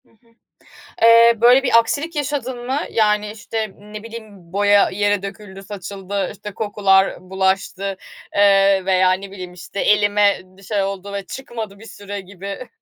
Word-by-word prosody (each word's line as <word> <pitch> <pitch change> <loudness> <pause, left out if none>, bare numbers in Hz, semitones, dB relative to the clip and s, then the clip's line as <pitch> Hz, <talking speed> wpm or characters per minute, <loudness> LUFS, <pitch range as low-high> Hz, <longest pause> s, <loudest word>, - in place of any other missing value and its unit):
Hı - - -30
hı. 230 +1 -31 0.8
Eee, 230 0 +7
böyle 245 +3 +6
bir 250 -3 +5
aksilik 290 +8 -1
yaşadın 260 -4 -3
mı? 265 +3 0
Yani, 210 -1 +1
işte, 220 -1 -4
ne 210 +1 -10
bileyim 215 -6 -11
boya 205 +1 +4
yere 205 0 0
döküldü 195 -1 -9
saçıldı. 195 -1 -5
İşte, 205 0 -9
kokular 195 -2 +2
bulaştı, 190 0 0 0.5
ııı, 195 -1 +4
veya 185 -1 +4
ne 195 +1 -4
bileyim, 185 -2 -8
işte, 180 +2 -7
elime 205 -1 +3
bir 185 +1 -21
şey 200 0 -1
oldu 195 0 -4
ve 200 -1 -5
çıkmadı 225 -6 -7
bir 225 - -13
süre 205 -2 -7
gibi. 195 +5 -8
205 Hz, 155 wpm, -20 LUFS, 195-225 Hz, 0.8 s, Eee